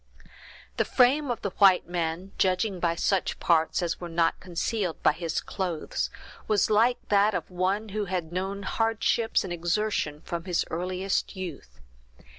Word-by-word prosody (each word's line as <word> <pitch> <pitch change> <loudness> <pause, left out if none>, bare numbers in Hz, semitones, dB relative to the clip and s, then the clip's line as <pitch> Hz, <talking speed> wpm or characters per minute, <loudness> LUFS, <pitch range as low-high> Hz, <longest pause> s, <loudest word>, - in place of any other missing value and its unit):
The - - +3
frame 270 +3 +3
of 240 - -3
the 200 - -1
white 195 -4 +6
man, 175 +2 -3
judging 185 +1 +1
by 170 -1 +1
such 190 +2 0
parts 165 +1 +2
as 170 0 -2
were 175 - -5
not 165 0 +1
concealed 185 +1 -3
by - - +6
his 165 +1 -3
clothes, 180 -5 -3 0.4
was 215 0 +2
like 230 +4 +4
that 205 0 +4
of 180 0 -4
one 190 +4 -1
who 210 +1 -2
had 175 -3 -3
known 195 +2 -3
hardships 225 +1 +1
and 185 -2 -4
exertion 175 -3 -1
from 170 0 -5
his 180 -3 0
earliest 185 +4 -2
youth. 140 - -8
185 Hz, 155 wpm, -27 LUFS, 170-210 Hz, 0.4 s, white